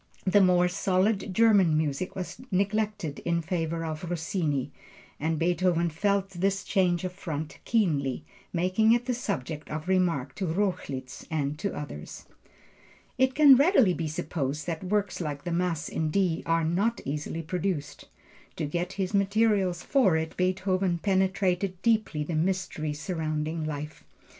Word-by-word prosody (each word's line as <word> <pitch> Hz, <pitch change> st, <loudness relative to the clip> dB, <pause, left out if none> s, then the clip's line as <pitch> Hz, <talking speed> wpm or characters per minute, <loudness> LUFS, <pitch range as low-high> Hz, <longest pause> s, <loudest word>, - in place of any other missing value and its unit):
The 195 Hz, +2 st, +5 dB
more 180 Hz, -1 st, +4 dB
solid 195 Hz, +2 st, +1 dB
German 195 Hz, -6 st, +4 dB
music 155 Hz, +3 st, -2 dB
was 185 Hz, +4 st, -6 dB
neglected 205 Hz, -4 st, -1 dB
in 170 Hz, -1 st, -1 dB
favor 165 Hz, -1 st, -2 dB
of 160 Hz, +2 st, -5 dB
Rossini, 160 Hz, -, -1 dB, 0.5 s
and 160 Hz, +2 st, 0 dB
Beethoven 170 Hz, 0 st, +1 dB
felt 195 Hz, +3 st, 0 dB
this 195 Hz, +2 st, 0 dB
change 180 Hz, -4 st, +1 dB
of 185 Hz, -1 st, -3 dB
front 160 Hz, -5 st, -5 dB
keenly, 150 Hz, -, +1 dB, 0.3 s
making 185 Hz, +6 st, +3 dB
it 240 Hz, 0 st, +1 dB
the 250 Hz, -, 0 dB
subject 160 Hz, -, -4 dB
of 155 Hz, +2 st, -5 dB
remark 170 Hz, -8 st, +1 dB
to 190 Hz, -, -2 dB
Rochlitz 160 Hz, -8 st, -3 dB
and 150 Hz, -3 st, -1 dB
to 200 Hz, +2 st, -2 dB
others. 110 Hz, -, -7 dB, 0.9 s
It 260 Hz, 0 st, +3 dB
can 290 Hz, -3 st, +8 dB
readily 270 Hz, -, +5 dB
be 165 Hz, -2 st, -3 dB
supposed 150 Hz, -1 st, -3 dB
that 165 Hz, 0 st, -4 dB
works 200 Hz, -1 st, -1 dB
like 145 Hz, -3 st, -4 dB
the 175 Hz, -, -3 dB
Mass 170 Hz, -2 st, -1 dB
in 160 Hz, -1 st, -1 dB
D 175 Hz, -1 st, +1 dB
are 165 Hz, 0 st, +2 dB
not 200 Hz, +8 st, +1 dB
easily 150 Hz, +3 st, -3 dB
produced. 160 Hz, -4 st, -3 dB, 0.5 s
To 160 Hz, -, -2 dB
get 175 Hz, +5 st, -2 dB
his 190 Hz, 0 st, -2 dB
materials 200 Hz, -3 st, +2 dB
for 210 Hz, -, +3 dB
it 160 Hz, 0 st, -3 dB
Beethoven 185 Hz, 0 st, +1 dB
penetrated 190 Hz, 0 st, 0 dB
deeply 215 Hz, -10 st, +1 dB
the 165 Hz, -, -4 dB
mystery 160 Hz, -2 st, -1 dB
surrounding 155 Hz, 0 st, -3 dB
life. 150 Hz, 0 st, -6 dB
180 Hz, 145 wpm, -28 LUFS, 155-195 Hz, 0.9 s, can